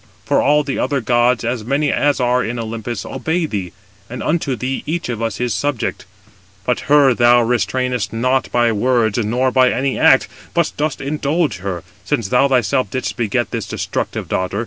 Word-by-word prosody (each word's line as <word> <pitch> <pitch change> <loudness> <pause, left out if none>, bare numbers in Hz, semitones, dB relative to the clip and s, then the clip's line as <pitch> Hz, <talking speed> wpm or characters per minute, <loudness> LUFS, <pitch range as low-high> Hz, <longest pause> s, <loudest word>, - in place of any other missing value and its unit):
For - - +2
all 150 +1 +3
the 140 -1 -3
other 140 - 0
gods, 120 0 +2
as 120 -1 -2
many 140 +5 0
as 145 -1 +1
are 125 0 +2
in 120 +2 -3
Olympus, 115 -1 -5
obey 165 +1 -1
thee, 100 - -4 0.4
and 125 - -6
unto 150 -4 0
thee 130 +3 -3
each 170 -2 -2
of 115 -2 -3
us 115 -3 -2
is 125 -1 0
subject. 145 -9 -2 0.6
But 125 - -2
her 145 -3 +6
thou 120 0 +5
restrainest 125 0 -1
not 130 +3 0
by 120 -1 +3
words, 115 0 +1
nor 125 +4 +1
by 130 0 +4
any 135 +1 -1
act, 135 - +5 0.3
but 170 -2 +2
dost 150 -2 -2
indulge 150 - -1
her, 95 -2 -5 0.2
since 115 -9 -1
thou 125 +5 +4
thyself 130 -2 +1
didst 130 +5 -3
beget 120 +1 -1
this 115 -3 -3
destructive - - -3
daughter. 95 +2 -2
125 Hz, 180 wpm, -18 LUFS, 115-140 Hz, 0.6 s, her